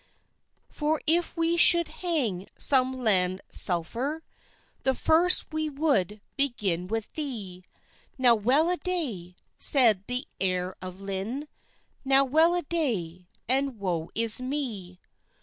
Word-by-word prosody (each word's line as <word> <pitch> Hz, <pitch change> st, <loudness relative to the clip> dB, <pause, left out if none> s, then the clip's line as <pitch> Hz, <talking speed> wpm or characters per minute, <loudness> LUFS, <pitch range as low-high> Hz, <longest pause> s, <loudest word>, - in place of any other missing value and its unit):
"For 305 Hz, 0 st, -2 dB
if 335 Hz, +2 st, 0 dB
we 330 Hz, +1 st, 0 dB
should 340 Hz, 0 st, +7 dB
hang 250 Hz, -, -2 dB
some 260 Hz, -2 st, +5 dB
land 190 Hz, -6 st, 0 dB
selfeer, 235 Hz, -, +1 dB, 0.6 s
The 265 Hz, -1 st, -1 dB
first 335 Hz, +3 st, +2 dB
we 310 Hz, 0 st, -2 dB
would 270 Hz, -, -1 dB
begin 205 Hz, -11 st, -2 dB
with 225 Hz, +1 st, -5 dB
thee." 210 Hz, -, -5 dB, 0.5 s
"Now 250 Hz, -2 st, +5 dB
well 260 Hz, -, +2 dB
a 360 Hz, -, 0 dB
day!" 260 Hz, -, -4 dB, 0.2 s
said 225 Hz, -9 st, +5 dB
the 250 Hz, +1 st, -4 dB
heire 185 Hz, -1 st, -2 dB
of 185 Hz, +1 st, -9 dB
Lynne, 200 Hz, +9 st, -5 dB, 0.6 s
"Now 270 Hz, 0 st, +4 dB
well 320 Hz, +6 st, +3 dB
a 350 Hz, -, 0 dB
day, 190 Hz, -, -4 dB, 0.2 s
and 265 Hz, 0 st, -1 dB
woe 175 Hz, -5 st, -4 dB
is 230 Hz, +2 st, +2 dB
mee! 235 Hz, -10 st, -5 dB
250 Hz, 125 wpm, -25 LUFS, 190-300 Hz, 0.6 s, should